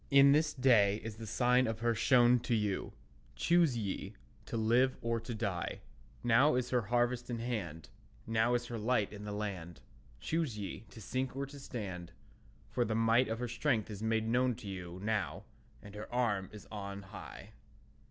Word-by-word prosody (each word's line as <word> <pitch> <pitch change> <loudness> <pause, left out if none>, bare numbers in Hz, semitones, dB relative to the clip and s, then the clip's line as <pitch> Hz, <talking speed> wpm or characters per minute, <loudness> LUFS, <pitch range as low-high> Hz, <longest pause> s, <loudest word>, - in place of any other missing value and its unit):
In 140 0 +7
this 155 +1 +3
day 110 -6 +4
is 110 -1 -6
the 110 0 -7
sign 125 +3 +3
of 110 0 -3
her 120 0 +2
shown 120 +1 +5
to 120 0 0
you; 105 -3 -1 0.4
Choose 170 - +3
ye, 100 -1 -4 0.3
to 115 - -3
live 120 +4 +3
or 115 0 0
to 115 +1 -6
die, 100 -6 -3 0.4
Now 125 +5 +5
is 125 -1 -1
her 125 -1 +3
harvest 120 +3 0
in 120 - -2
hand; 105 -10 -4 0.4
Now 115 +2 +2
is 120 0 -1
her 120 -1 -5
light 110 -2 +1
in 105 0 -8
the 105 - -4
land; 95 -7 -5 0.4
Choose 155 -9 -1
ye, 100 +1 -6
to - - -12
sink 130 +5 -3
or 140 +1 -2
to 140 +1 -11
stand, 95 -9 -6 0.6
For 120 - +1
the 110 -2 -1
might 115 +3 +4
of 115 - -2
her 125 +1 -3
strength 115 -2 0
is 105 -1 -7
made 110 0 +1
known 125 +1 +2
to 105 - -10
you 90 -2 -6
Now, 105 -1 -1 0.4
and 100 - -11
her 105 0 -8
arm 110 -6 0
is 105 - -11
on 100 -1 -6
high. 95 - -10
115 Hz, 185 wpm, -33 LUFS, 105-125 Hz, 0.6 s, In